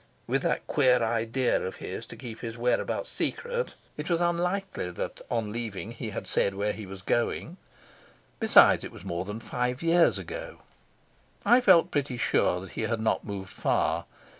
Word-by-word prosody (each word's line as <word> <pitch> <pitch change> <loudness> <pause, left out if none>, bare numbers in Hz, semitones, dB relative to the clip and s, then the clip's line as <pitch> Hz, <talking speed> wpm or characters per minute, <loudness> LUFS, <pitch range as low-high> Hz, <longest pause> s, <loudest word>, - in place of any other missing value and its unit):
With - - 0
that - - 0
queer 125 -4 +3
idea 115 +3 +1
of 95 - -4
his - - -6
to - - -9
keep 115 -2 -8
his 115 -1 -6
whereabouts 125 - 0
secret, 485 0 -2 0.2
it 150 +3 -4
was 170 -1 +2
unlikely 175 - -1
that, 90 - -5
on 115 -3 -1
leaving, 115 -2 -5
he 115 -1 -5
had 100 - -5
said 100 - +2
where 105 +1 0
he 105 -3 -8
was 95 0 -9
going. 120 - -1 0.8
Besides, - - +6
it - - -6
was - - -12
more 85 +2 -3
than 105 +3 -5
five 125 +4 -2
years 165 +1 +4
ago. - - -7 0.8
I 245 +2 +6
felt 180 -6 +6
pretty 140 -4 -1
sure 90 -5 +2
that 95 - -10
he - - -4
had 110 0 -1
not 110 - 0
moved 95 -2 -6
far. - - 0
120 Hz, 175 wpm, -28 LUFS, 105-170 Hz, 0.8 s, Besides